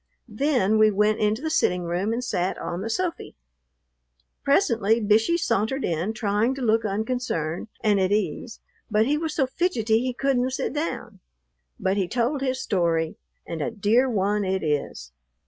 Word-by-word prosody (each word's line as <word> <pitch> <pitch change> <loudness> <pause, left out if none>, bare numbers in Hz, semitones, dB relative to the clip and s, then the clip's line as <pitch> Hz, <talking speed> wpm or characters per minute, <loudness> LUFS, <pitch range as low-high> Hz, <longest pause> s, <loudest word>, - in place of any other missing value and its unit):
Then 220 -5 +2
we 215 0 +6
went 210 +1 +2
into 215 +5 0
the 315 - -1
sitting 180 - +1
room 175 +5 -1
and 235 +2 -2
sat 185 -6 -1
on 175 +2 -4
the 220 - -4
"sofy." 350 +8 -3 1.1
Presently 230 - +3
Bishey 225 +9 +3
sauntered 270 - 0
in, 170 +5 -1
trying 215 +3 0
to 270 - -7
look 225 -1 +2
unconcerned 210 -6 -2
and 210 -3 +3
at 190 0 +1
ease, 210 +2 -2 0.3
but 215 0 +3
he 285 +4 +1
was 310 0 -3
so 270 - +2
fidgety 245 -7 +1
he 255 +1 -2
couldn't 260 -2 +1
sit 260 - -3
down. 245 - -4 0.6
But 190 +1 0
he 190 -3 0
told 250 +7 -1
his 260 -1 -1
story, 170 -8 0 0.3
and 165 -2 -5
a - - -1
dear 230 +4 +2
one 205 -1 0
it 190 0 -1
is. 145 - -2
220 Hz, 165 wpm, -24 LUFS, 195-255 Hz, 1.1 s, we